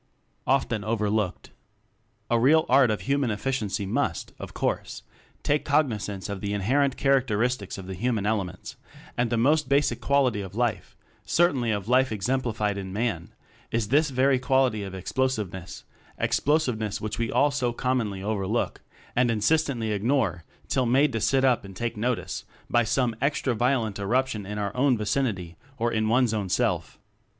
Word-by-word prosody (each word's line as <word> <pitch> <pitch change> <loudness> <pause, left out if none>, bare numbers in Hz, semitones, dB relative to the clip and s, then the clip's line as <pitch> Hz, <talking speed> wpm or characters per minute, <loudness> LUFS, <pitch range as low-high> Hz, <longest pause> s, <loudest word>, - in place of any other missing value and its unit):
Often 120 -5 +1
Overlooked. 105 -3 -1 0.8
A 120 - +4
real 155 +6 +5
Art 135 -3 +5
of 110 - -1
Human 140 -2 0
Efficiency 105 -2 -2
must, 95 - -2
of - - -7
course, - - -2 0.4
take 145 +1 +1
cognizance 110 -10 0
of 100 -2 -5
the 100 0 -2
inherent 130 +7 +1
characteristics 125 -5 +1
of 95 - -8
the 95 - -6
hu 120 +8 -1
man 105 -4 -1
elements; 95 -4 -3 0.4
and 120 -1 0
the 120 - 0
most 150 +6 +2
basic 140 +1 +2
quality 130 -7 +2
of 95 0 -8
life 115 -6 -2 0.3
certainly 140 -9 +2
of 105 -2 -1
life 130 +2 +4
exem 120 +5 -1
plified 105 -4 -1
in 95 -1 -6
Man 100 -5 -2 0.4
is 115 -3 -1
this 150 +4 +3
very 130 0 +2
quality 130 -4 +2
of 95 -1 -6
explosiveness 95 -4 -3 0.3
explosiveness 125 -9 0
which 110 +1 -4
we 115 -1 -1
all 145 0 +3
so 130 -4 0
commonly 115 -6 -1
overlook 105 +1 -1 0.3
and 125 0 +3
insist 115 +9 +2
ently 115 -6 -2
ignore 105 - 0 0.2
till 130 -2 +1
made 135 +3 +3
to 115 - -1
sit 135 +3 +3
up 125 -3 +3
and 95 -1 -11
take 115 +3 -3
notice 120 +2 -2 0.3
by 120 - +4
some 115 +1 0
extra 140 -2 +1
violent 120 -3 0
eruption 110 0 0
in 105 +1 -5
our 100 -1 -3
own 130 -1 +3
vicinity, 105 -7 -2 0.2
or 120 0 0
in 110 -1 0
one's 120 -1 +3
own 100 -3 -2
self. - - 0
115 Hz, 165 wpm, -26 LUFS, 105-130 Hz, 0.8 s, real